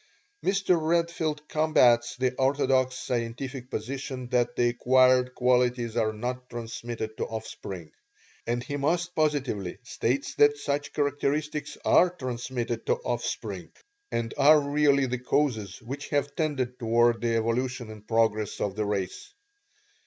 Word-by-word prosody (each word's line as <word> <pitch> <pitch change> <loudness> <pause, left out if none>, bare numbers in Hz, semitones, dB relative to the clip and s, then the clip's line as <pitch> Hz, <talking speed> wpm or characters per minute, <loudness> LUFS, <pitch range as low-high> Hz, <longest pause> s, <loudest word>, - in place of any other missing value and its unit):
Mr. 190 -3 +2
Redfield 160 -2 0
combats 125 -7 +3
the 130 0 +1
orthodox 130 -1 +2
scientific 125 +2 -4
position 130 +1 -5
that 125 -2 +1
the 120 0 +3
acquired 125 +1 +3
qualities 125 -2 +2
are 110 -2 +2
not 125 +3 -5
transmitted 115 -1 -5
to - - -1
offspring; 95 -7 -7 0.6
and 120 +1 -1
he 145 +3 -4
most 170 +5 0
positively 135 - -1
states 125 +2 -1
that 145 0 +4
such 145 0 -2
characteristics 145 +1 -1
are 180 - +6
transmitted 125 -6 -4
to - - +3
offspring, 485 - -4 0.4
and 115 -1 -2
are 150 +2 +7
really 140 -1 +3
the 125 -1 -2
causes 115 -7 0
which 135 +5 -6
have 145 0 -1
tended 135 -6 -1
toward 120 0 +3
the 115 -1 +1
evolution 120 +1 -1
and 105 -1 -12
progress 110 -2 +1
of 100 -2 -2
the 105 0 -1
race. 100 - -3
125 Hz, 130 wpm, -27 LUFS, 115-145 Hz, 0.6 s, are